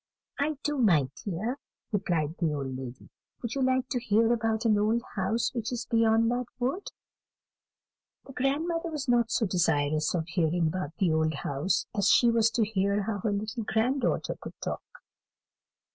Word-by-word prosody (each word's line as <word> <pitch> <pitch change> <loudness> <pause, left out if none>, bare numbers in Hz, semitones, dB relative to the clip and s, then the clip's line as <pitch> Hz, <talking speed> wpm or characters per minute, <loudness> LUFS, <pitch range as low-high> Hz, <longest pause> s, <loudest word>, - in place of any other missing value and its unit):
"I 295 +1 0
do, 295 -2 -1
my 165 - +4
dear," 215 +8 -3 0.3
replied 170 -7 0
the 165 -4 +1
old 135 -2 -4
lady. 130 -1 -8 0.4
"Would 235 - -3
you 275 - -2
like 260 0 +2
to 250 - 0
hear 230 0 +3
about 225 0 0
an 220 -2 +5
old 225 +3 +1
house 220 +4 0
which 235 -1 -3
is 245 -1 -3
beyond 225 0 +3
that 245 0 -1
wood?" 265 +11 -2 1.4
The 270 - -11
grandmother 330 +6 0
was 300 -3 -4
not 240 -2 +3
so 230 - +1
desirous 155 -4 +1
of 160 -2 -1
hearing 170 -1 +1
about 160 -1 -2
the 185 -5 +2
old 160 -1 +1
house, 145 +6 -1
as 200 -3 +3
she 240 -1 +6
was 230 -1 +4
to 225 -1 +1
hear 200 -1 0
how 205 0 -2
her 210 +2 -1
little 215 +4 -3
grand 240 +6 +1
daughter - - 0
could - - -9
talk. - - -4
220 Hz, 175 wpm, -28 LUFS, 175-245 Hz, 1.4 s, she